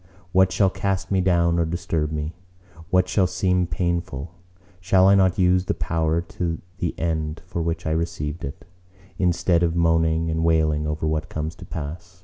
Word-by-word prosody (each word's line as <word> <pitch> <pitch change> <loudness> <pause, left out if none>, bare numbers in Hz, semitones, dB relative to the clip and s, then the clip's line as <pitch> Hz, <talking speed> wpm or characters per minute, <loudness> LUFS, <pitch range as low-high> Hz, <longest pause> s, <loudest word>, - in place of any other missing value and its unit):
What 95 0 +4
shall 95 -1 +3
cast 95 0 -2
me 95 -1 +3
down 85 -2 +2
or 85 - +2
disturb 85 -3 -2
me? 75 +1 -3 0.6
What 90 0 +3
shall 95 -1 +2
seem 90 -1 +1
painful? 85 -4 -2 0.5
Shall 95 +1 +4
I 100 - +7
not 95 -2 +3
use 90 0 +3
the - - -1
power 80 0 0
to 85 -1 -4 0.2
the 85 - -2
end 80 -1 -2
for 85 - -4
which 80 0 -2
I 80 - 0
received 80 -1 -2
it, 70 - -7 0.5
instead 90 -1 +2
of 85 -1 +1
moaning 80 -1 +2
and 80 0 -1
wailing 80 -2 +2
over 75 +1 -2
what 80 0 -1
comes 80 +1 -3
to 90 - -10
pass? 85 +3 -7
85 Hz, 175 wpm, -23 LUFS, 80-90 Hz, 0.6 s, I